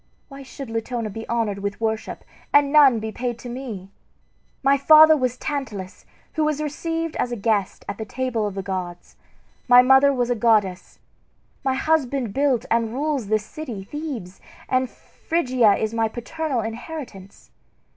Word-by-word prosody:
Why 275 -1 -10
should 270 -2 -9
Latona 225 -1 -3
be 225 +3 -7
honored 225 -4 -1
with 200 0 -4
worship, 220 -1 -3 0.3
and 285 -1 +4
none 280 -5 +7
be 220 0 -5
paid 240 0 -3
to 245 - -9
me? 230 -7 -7 0.7
My 275 +1 +5
father 310 +3 +7
was 255 -3 -1
Tantalus, 220 -12 -5 0.3
who 315 - 0
was 305 -1 0
received 325 +2 -3
as 245 - -1
a - - -1
guest 205 -3 -1
at 200 - -5
the - - -2
table 240 -2 -2
of 200 - -6
the 195 - -4
gods; 180 -2 -6 0.5
my 245 0 +8
mother 265 +2 +6
was 245 -2 0
a - - +2
goddess. 210 -5 +1 0.7
My 265 -1 +1
husband 270 -6 0
built 265 -4 +1
and 230 -1 +1
rules 285 -5 -1
this 215 0 0
city, 235 -8 -7
Thebes, 240 - -7 0.3
and 255 0 +1
Phrygia 255 -10 +1
is 220 +2 -2
my 225 -1 +1
paternal 255 +3 -3
inheritance. 225 - -8
245 Hz, 160 wpm, -23 LUFS, 215-280 Hz, 0.7 s, my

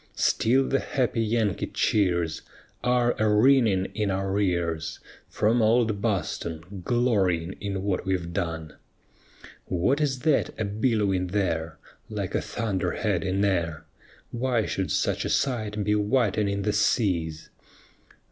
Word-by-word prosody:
Still 130 +4 +2
the 135 - +1
happy 125 -4 -1
Yankee 110 -4 0
cheers 85 -6 +1 0.4
Are 125 -1 +3
a 110 -1 +3
ringing 110 -4 +4
in 105 -2 -1
our 95 +1 -1
ears 85 -4 -1 0.3
From 115 +3 +2
old 110 -2 +2
Boston, 90 -3 -3
glorying 95 -8 +1
in 95 -2 -3
what 100 -2 -1
we've 90 -3 -2
done. 80 -4 -4 0.9
_What 125 - +1
is 130 -4 0
that 155 -6 +1
a 110 - 0
billowing 100 -3 0
there 85 -4 -1 0.3
Like - - -4
a - - +1
thunderhead 105 -2 -1
in 95 +1 +1
air? 85 -5 -1 0.5
Why 120 -2 0
should 95 -1 -2
such - - 0
a - - -2
sight 110 -6 0
be 105 - +1
whitening 105 -2 +1
the 105 +1 0
seas? 90 -7 0
100 Hz, 130 wpm, -26 LUFS, 90-115 Hz, 0.9 s, ringing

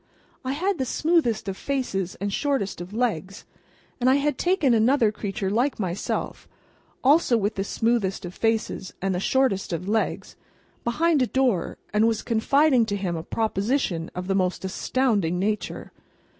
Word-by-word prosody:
I 260 +1 -2
had 370 +5 -1
the 260 - 0
smoothest 255 - +1
of 195 - -2
faces 195 -9 -2
and 200 0 -2
the - - -6
shortest 270 -11 -1
of 175 +2 -8
legs, 205 -5 -2 0.5
and 250 +1 +3
I 260 - +5
had 285 +1 +1
taken 325 -4 +2
another 230 0 +4
creature 195 -2 -3
like 245 +6 +1
myself, 185 -2 -3 0.6
also 275 -3 +4
with 210 0 0
the 195 - -2
smoothest 205 -3 0
of 175 - -7
faces 225 -4 -1
and 195 0 -1
the 180 - -1
shortest 210 -3 +1
of 175 +2 -3
legs, 220 +2 -1 0.5
behind 310 +5 +2
a 250 - +2
door, 250 -10 0 0.2
and 215 +2 +4
was 225 -1 0
confiding 255 +3 +3
to 205 - -1
him 190 -4 -2
a 160 - -3
proposition 205 - -1
of 180 0 -4
the 195 - 0
most 185 0 0
astounding 200 -4 0
nature. 210 +3 -2
220 Hz, 165 wpm, -25 LUFS, 195-265 Hz, 0.6 s, I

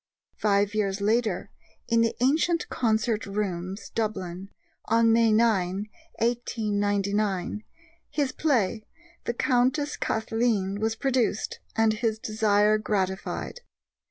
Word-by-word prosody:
Five 205 -1 +2
years 200 -2 0
later, 210 -2 0 0.4
in 230 -1 +3
the 230 - +1
Antient 315 +6 +2
Concert 220 -2 0
Rooms, 195 -1 -4
Dublin, 195 -4 -3 0.4
on 230 0 +4
May 230 -1 +4
9, 210 -3 +2 0.3
1899, 205 -4 0 0.5
his 285 -3 0
play, 230 -9 +1 0.4
The 235 - -2
Countess 260 +4 +1
Cathleen, 220 -3 0
was 220 +1 0
produced, 245 -4 0 0.2
and 225 -1 +3
his 220 0 -1
desire 215 -1 +2
gratified. 195 - -2
215 Hz, 100 wpm, -26 LUFS, 200-230 Hz, 0.5 s, on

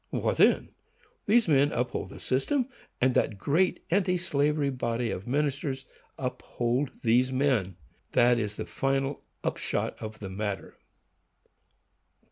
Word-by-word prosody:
What - - 0
then? - - +4 0.6
These 230 +1 +4
men 145 -1 +4
uphold 125 +1 -2
the - - -10
system, 250 - 0 0.3
and 130 0 +3
that 105 - +1
great 165 - +1
anti 180 -1 +3
slavery 150 -4 +1
body 120 -2 -1
of 95 - -5
ministers 140 0 -1 0.3
uphold 125 +1 -1
these 125 +3 +3
men. 130 -9 +1 0.4
That 120 0 +5
is 105 -2 -2
the - - -4
final 135 +1 -1 0.2
upshot - - -2
of 110 0 -6
the 95 -2 -7
matter. 100 0 -4
130 Hz, 125 wpm, -28 LUFS, 120-145 Hz, 0.6 s, That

